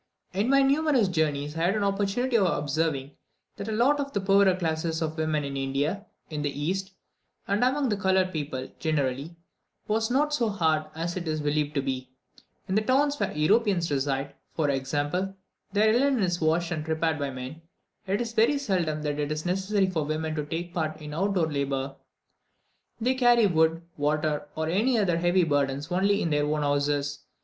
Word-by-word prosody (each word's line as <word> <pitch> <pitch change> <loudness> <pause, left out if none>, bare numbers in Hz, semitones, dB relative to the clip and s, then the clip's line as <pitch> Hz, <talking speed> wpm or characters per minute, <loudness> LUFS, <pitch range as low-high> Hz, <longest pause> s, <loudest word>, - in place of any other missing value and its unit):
In 200 +6 0
my 275 0 +5
numerous 275 -5 +3
journeys, 150 -4 -1
I 165 +1 0
had 190 +4 +2
an 210 - 0
opportunity 205 +6 0
of 200 -5 +4
observing 145 -3 -1 0.5
that 200 - -5
the 220 - -3
lot 255 +7 +3
of 280 0 -3
the 200 - +1
poorer 195 -1 +4
classes 160 -2 -1
of 160 -1 -2
women 155 -2 0
in 140 -1 -4
India, 140 +9 -1 0.2
in 150 -1 -3
the 145 - 0
East, 185 +7 -3 0.5
and 205 +4 +1
among 265 0 +2
coloured 190 -1 +2
people 140 -4 -3
generally, 145 0 -1 0.5
was 220 +1 +1
not 295 +4 +2
so 235 -6 +1
hard 160 -6 +1
as 170 +2 -3
it 175 -2 -4
is 155 0 -1
believed 150 0 -1
to 140 - +1
be. 130 -1 -3 0.6
In 190 - -2
the 215 - +3
towns 280 +5 +2
where - - 0
Europeans 185 +1 +2
reside, 140 0 -1 0.2
for 150 -3 +1
example, 145 +8 -1 0.4
their 215 +2 +4
linen 260 -2 +3
is 175 -1 0
washed 165 +2 +1
and 155 -3 -2
prepared 160 0 0
by 140 -1 -1
men; 130 +4 -7 0.5
it 200 +4 0
is 230 -1 -4
very 235 +6 +3
seldom 175 - -1
that 145 0 -2
it 145 0 -1
is 155 +2 -3
necessary 190 +2 +1
for 170 -4 -1
women 155 +1 -2
to 150 -1 -2
take 170 +4 -5
part 155 -2 -2
in 150 -1 -8
out 195 +5 0
door 175 -3 +3
labour; 140 -1 -2 1.0
they 250 +3 +2
carry 240 -3 +4
wood, 165 -2 +2
water, 150 0 0
or 160 0 -2
any 220 +9 +2
other 180 -6 +2
heavy 175 +1 +3
burdens 145 -1 0
only 200 +3 +2
in 165 - -1
their 145 0 +2
own 150 0 0
houses. 145 0 0
165 Hz, 190 wpm, -27 LUFS, 150-200 Hz, 1.0 s, my